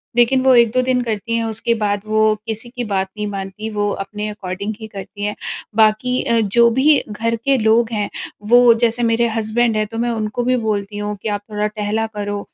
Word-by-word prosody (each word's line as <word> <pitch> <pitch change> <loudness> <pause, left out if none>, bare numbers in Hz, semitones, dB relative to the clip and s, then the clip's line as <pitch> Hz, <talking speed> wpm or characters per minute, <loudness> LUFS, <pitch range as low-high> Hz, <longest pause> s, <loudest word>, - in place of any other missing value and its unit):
लेकिन 240 +2 +4
वो 260 0 +5
1-2 235 +1 +4
दिन 255 0 +1
करती 230 0 -2
हैं, 230 - 0
उसके 225 +1 -1
बाद 205 -1 0
वो 215 0 +3
किसी 225 +2 -4
की 245 0 -5
बात 195 -3 -1
नहीं 210 - -2
मानती, 200 +2 -5
वो 205 -1 -1
अपने 210 +2 -6
अकॉर्डिंग 200 0 -5
ही 220 - -7
करतीं 200 0 -8
है। 210 - -2 0.4
बाक़ी 220 +3 +3
अ, 235 -1 +2
जो 235 +3 +4
भी 280 +5 +4
घर 230 +2 -1
के 275 -1 +4
लोग 225 +1 +2
हैं 210 -1 -1 0.4
वो 245 -1 +7
जैसे 235 +1 +2
मेरे 230 0 +2
हस्बैंड 225 +1 +1
हैं 215 - +1
तो 225 - -8
मैं 240 - 0
उनको 220 +1 -2
भी 255 +1 +2
बोलती 205 -1 -2
हूँ 210 0 -3
कि 220 - -3
आप 205 -1 -2
थोड़ा 210 0 0
टहला 210 +1 -2
करो 205 0 -3
220 Hz, 210 wpm, -19 LUFS, 210-235 Hz, 0.4 s, वो